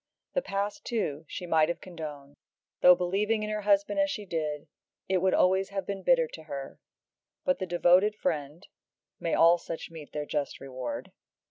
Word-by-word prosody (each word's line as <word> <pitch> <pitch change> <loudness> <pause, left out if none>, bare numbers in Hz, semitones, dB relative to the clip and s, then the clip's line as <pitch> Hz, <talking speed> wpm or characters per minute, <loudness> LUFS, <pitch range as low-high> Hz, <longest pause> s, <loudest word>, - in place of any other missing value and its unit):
The - - +1
past, 200 - -3
too, 160 -10 -2
she 180 - -6
might 160 -2 +3
have 170 - -2
condoned; 150 -5 -8 0.5
though, 180 0 +9
believing 205 +5 0
in 210 - -3
her 215 0 -2
husband 200 +7 +2
as 295 0 +3
she 210 -7 -4
did, 155 -4 -3 0.4
it 190 -1 +2
would 190 +1 +2
always 190 +1 +3
have 195 -1 -3
been 200 -1 -4
bitter 250 +3 +4
to 160 - -10
her, 140 -3 -7 0.7
but 275 0 +2
the 185 - -3
devoted 180 +4 +4
friend 160 -2 -3 0.5
may 165 - 0
all 170 +1 +6
such 165 0 -7
meet 160 -3 -10
their 150 -1 -3
just 145 -1 -3
reward! 130 -2 -6
180 Hz, 175 wpm, -29 LUFS, 155-200 Hz, 0.7 s, though